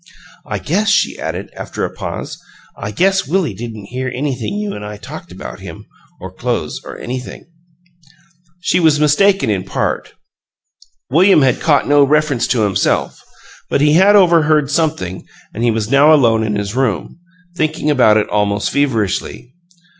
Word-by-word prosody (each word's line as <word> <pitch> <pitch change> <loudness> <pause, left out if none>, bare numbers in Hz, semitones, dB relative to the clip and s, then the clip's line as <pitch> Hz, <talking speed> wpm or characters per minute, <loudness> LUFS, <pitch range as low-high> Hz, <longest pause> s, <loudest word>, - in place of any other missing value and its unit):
"I - - -3
guess," 205 +7 -1
she - - +1
added, - - -5
after - - -4
a - - -7
pause - - -6 0.3
"I 105 - -6
guess 190 - +1
Willie 165 - 0
didn't 110 -1 -8
hear 130 +1 -3
anything 135 +7 -3
you 210 -1 -3
an' 105 - -7
I 105 0 -7
talked 100 - -10
about - - -9
him, - - -10 0.3
or - - -9
clo'es, - - -3
or - - -9
anything." 125 +1 -7 1.2
She 180 - +1
was 160 -3 +3
mistaken 150 - +3
in 95 -3 -1
part. - - -3 1.0
William 175 +1 +5
had 130 -2 +2
caught 145 -3 +2
no 145 0 +5
reference 145 -3 +1
to 120 - +1
himself, 100 -2 0 0.5
but - - +1
he 150 +1 +3
had 195 +5 +5
overheard 155 -6 +4
something 150 - -1 0.3
and 115 - -4
he 120 - +3
was 110 0 -2
now 140 +3 +6
alone 115 -7 +4
in 110 -1 -1
his 100 0 -3
room, 130 - -2 0.4
thinking 155 -2 -1
about 120 -6 +4
it 105 - +1
almost 105 0 0
feverishly. 120 -2 -2
140 Hz, 160 wpm, -16 LUFS, 110-155 Hz, 1.2 s, now